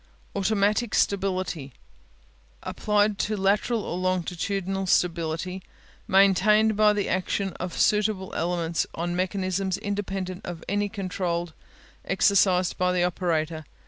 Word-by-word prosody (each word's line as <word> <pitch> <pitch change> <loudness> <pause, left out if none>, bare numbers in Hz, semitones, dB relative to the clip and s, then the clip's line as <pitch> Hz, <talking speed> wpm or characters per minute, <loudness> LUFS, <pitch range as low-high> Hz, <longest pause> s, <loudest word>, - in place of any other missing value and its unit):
Automatic 205 +3 +1
Stability 185 -8 -1 0.9
Applied 210 -1 +1
to 215 0 -1
lateral 205 +3 +1
or 175 - -4
longitudinal 185 +1 -1
stability 170 +1 0 0.5
maintained 205 +2 +4
by 210 0 +5
the 205 -1 -1
action 190 +1 -1
of 180 -1 -4
suitable 210 -3 +1
elements 170 0 -1
on 175 +1 -2
mechanisms 185 0 -1
independent 195 -2 -4
of 170 -2 -7
any 205 +1 0
control 180 -4 -2 0.5
exercised 190 -2 +2
by 180 0 +2
the 180 -1 +1
operator. 165 -3 -1
190 Hz, 110 wpm, -26 LUFS, 180-200 Hz, 0.9 s, by